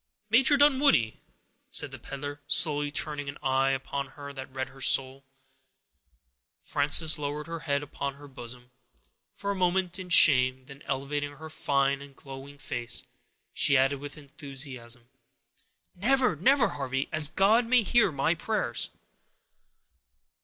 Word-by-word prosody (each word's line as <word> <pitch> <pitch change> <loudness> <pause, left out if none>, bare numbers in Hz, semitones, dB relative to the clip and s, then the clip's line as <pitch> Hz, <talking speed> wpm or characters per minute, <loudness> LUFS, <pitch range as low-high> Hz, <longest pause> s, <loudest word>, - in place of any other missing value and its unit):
"Major 270 +5 +6
Dunwoodie"—said 270 - +1
the - - -9
peddler, 145 +1 -7
slowly, 145 0 +1
turning 145 -1 -2
an 140 - -8
eye 135 0 +2
upon 135 +1 -3
her 140 0 -10
that 130 -1 -9
read 130 0 -4
her 135 +1 -16
soul. 135 +1 +3 1.4
Frances 150 +2 +3
lowered 145 +1 -4
her 165 0 -6
head 145 -3 -1
upon 140 -1 -5
her 145 +1 -13
bosom, 125 -1 -11 0.6
for 200 - -3
a - - -3
moment, 185 0 0
in 185 -1 -8
shame; 130 -6 +5
then, 140 +1 -13
elevating 145 +2 -3
her 155 +2 -11
fine 140 -2 0
and 140 -1 -13
glowing 135 +1 -11
face, 120 -3 -4 0.5
she 140 -2 +2
added, 135 +1 +2
with 145 +1 -8
enthusiasm,— 135 -4 -7 0.9
"Never, 250 +2 +1
never, 255 - +3
Harvey, 135 -1 -3
as 155 -1 +3
God 215 +9 +3
may 245 -1 +4
hear 225 -1 +3
my 140 +3 +1
prayers!" 165 - -2
145 Hz, 135 wpm, -28 LUFS, 135-165 Hz, 1.4 s, Major